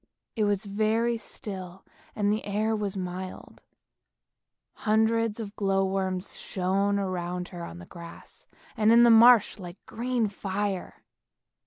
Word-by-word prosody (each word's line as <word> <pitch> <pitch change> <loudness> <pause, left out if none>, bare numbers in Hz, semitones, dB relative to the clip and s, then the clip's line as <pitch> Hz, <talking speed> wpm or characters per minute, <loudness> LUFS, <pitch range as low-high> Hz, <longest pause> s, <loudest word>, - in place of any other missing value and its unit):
It 215 -3 +1
was 205 0 0
very 220 +3 +1
still 190 -4 -8 0.3
and 205 -1 +1
the 215 - -2
air 215 +2 0
was 205 -2 -3
mild, 185 0 -6 1.1
hundreds 220 +1 +1
of 210 -2 -6
glow 195 -1 +1
worms 190 -1 -2
shone 195 +2 0
around 180 -2 -3
her 175 -2 -8
on 85 - -8
the 85 - -10
grass 170 - -12 0.3
and 220 0 +3
in 235 +1 +7
the 235 - +7
marsh 230 -1 +6
like 180 0 -9
green 240 -1 -1
fire. 195 - -4
200 Hz, 135 wpm, -27 LUFS, 185-220 Hz, 1.1 s, in